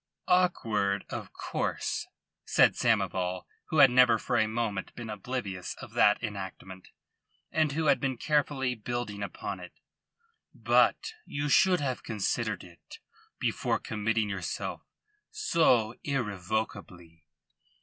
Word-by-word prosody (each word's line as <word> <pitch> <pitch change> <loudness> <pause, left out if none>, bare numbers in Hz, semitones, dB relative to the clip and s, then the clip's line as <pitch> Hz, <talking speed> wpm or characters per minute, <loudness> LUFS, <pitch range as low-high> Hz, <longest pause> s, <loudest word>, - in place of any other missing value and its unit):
"Awkward, 110 - +2
of - - -5
course," - - -3 0.4
said - - +4
Samoval, 90 -1 0 0.3
who 160 - -1
had 135 -3 +8
never 125 -2 +6
for - - -2
a 110 - +3
moment 110 -3 -3
been 115 -3 -6
oblivious 105 -4 -4
of - - -11
that 105 +3 +4
enactment, 95 -3 -7 0.6
and 155 -3 +1
who 160 +2 -1
had 145 - +4
been 135 -3 -1
carefully 140 -2 +1
building 115 -2 -4
upon 100 - -5
it. - - -10 0.8
"But 445 - +2
you 145 +1 -2
should 180 +2 +5
have 130 -3 -2
considered 110 +1 -2
it 85 -3 -14 0.4
before - - 0
committing 110 0 -1
yourself 95 -3 -4 0.5
so 160 - +2
irrevocably." 100 - -3
110 Hz, 120 wpm, -29 LUFS, 100-135 Hz, 0.8 s, had